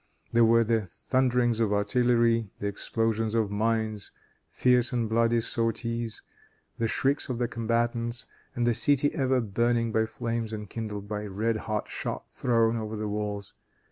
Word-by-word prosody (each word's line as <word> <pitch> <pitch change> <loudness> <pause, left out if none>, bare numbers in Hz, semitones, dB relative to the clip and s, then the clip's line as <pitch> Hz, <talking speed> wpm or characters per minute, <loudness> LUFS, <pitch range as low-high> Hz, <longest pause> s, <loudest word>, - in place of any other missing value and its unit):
There 115 0 +5
were 115 +1 +5
the 110 -3 0
thunderings 125 +1 +1
of 110 -3 +2
artillery, 115 +1 +2
the - - -4
explosion 110 +2 0
of 110 -3 +1
mines, 110 -1 -1 0.4
fierce 125 0 +3
and 120 -3 0
bloody 115 +1 +2
sorties, 115 0 -1 0.6
the 115 - +1
shrieks 135 +5 0
of 125 - -2
the 120 0 0
combatants, 115 +1 -1 0.3
and 120 - 0
the 120 - +3
city 145 +4 +3
ever 130 -1 +2
burning 115 +1 +1
by 110 0 +1
flames 115 -1 -3
enkindled 105 -1 -6
by 105 0 -4
red 110 +3 -1
hot 105 0 -1
shot - - -5
thrown 115 -2 +2
over 110 -1 -4
the 105 0 -3
walls. 105 -1 -3
115 Hz, 150 wpm, -28 LUFS, 110-120 Hz, 0.6 s, There